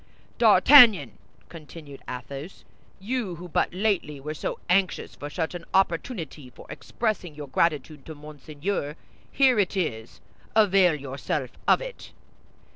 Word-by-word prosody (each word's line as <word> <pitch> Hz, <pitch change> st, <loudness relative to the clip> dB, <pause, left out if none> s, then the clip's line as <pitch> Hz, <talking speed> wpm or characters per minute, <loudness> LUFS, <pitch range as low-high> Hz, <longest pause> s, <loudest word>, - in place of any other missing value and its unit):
D'Artagnan," 245 Hz, -9 st, +6 dB, 0.3 s
continued 155 Hz, -3 st, -12 dB
Athos, 135 Hz, +7 st, -8 dB, 0.4 s
"you, 210 Hz, -2 st, -3 dB
who 175 Hz, +2 st, -10 dB
but 170 Hz, -, 0 dB
lately 185 Hz, -6 st, -1 dB
were 150 Hz, +3 st, -6 dB
so 155 Hz, -, -4 dB
anxious 185 Hz, +1 st, 0 dB
for 145 Hz, -, -8 dB
such 160 Hz, +2 st, -3 dB
an 175 Hz, -1 st, -7 dB
opportunity 165 Hz, -, -1 dB
for -, -, -15 dB
expressing 205 Hz, -8 st, -4 dB
your 145 Hz, -1 st, -8 dB
gratitude 150 Hz, 0 st, -1 dB
to 160 Hz, -, -8 dB
Monseigneur, 150 Hz, +2 st, -5 dB, 0.4 s
here 260 Hz, -5 st, +3 dB
it 195 Hz, 0 st, 0 dB
is; 110 Hz, -11 st, -4 dB, 0.4 s
avail 195 Hz, -5 st, +4 dB
yourself 140 Hz, -1 st, -4 dB, 0.2 s
of -, -, +4 dB
it." -, -, -9 dB
165 Hz, 125 wpm, -25 LUFS, 145-195 Hz, 0.4 s, D'Artagnan